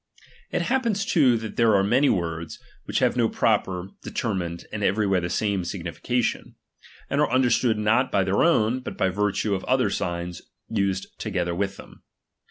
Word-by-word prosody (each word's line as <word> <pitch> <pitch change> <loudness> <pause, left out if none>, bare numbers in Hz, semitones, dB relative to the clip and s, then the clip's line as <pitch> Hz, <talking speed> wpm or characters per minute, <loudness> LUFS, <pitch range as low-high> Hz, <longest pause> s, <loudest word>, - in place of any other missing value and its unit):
It - - -1
happens 235 -6 0
too 130 -8 +4
that 110 -1 -7
there 115 -3 +4
are 95 - +4
many 130 +8 +3
words, 85 -3 -2 0.3
which - - -2
have - - +2
no - - +2
proper, 90 0 0
determined, 90 -7 -3
and 105 -1 -3
everywhere 100 -2 +2
the 85 - -3
same 100 -1 0
signification; 100 +7 -2 0.5
and 140 +2 0
are 150 - +2
understood 120 -2 +2
not 110 +5 +2
by 100 - +2
their 95 +1 +1
own, 125 -7 +3
but 130 - -7
by 95 - +2
virtue 105 +2 0
ol 95 - -2
other 130 -6 +2
signs 85 -2 -3 0.3
used 100 -3 0
together 90 -1 -2
with 95 +2 -2
them. - - -14
100 Hz, 170 wpm, -25 LUFS, 95-120 Hz, 0.5 s, too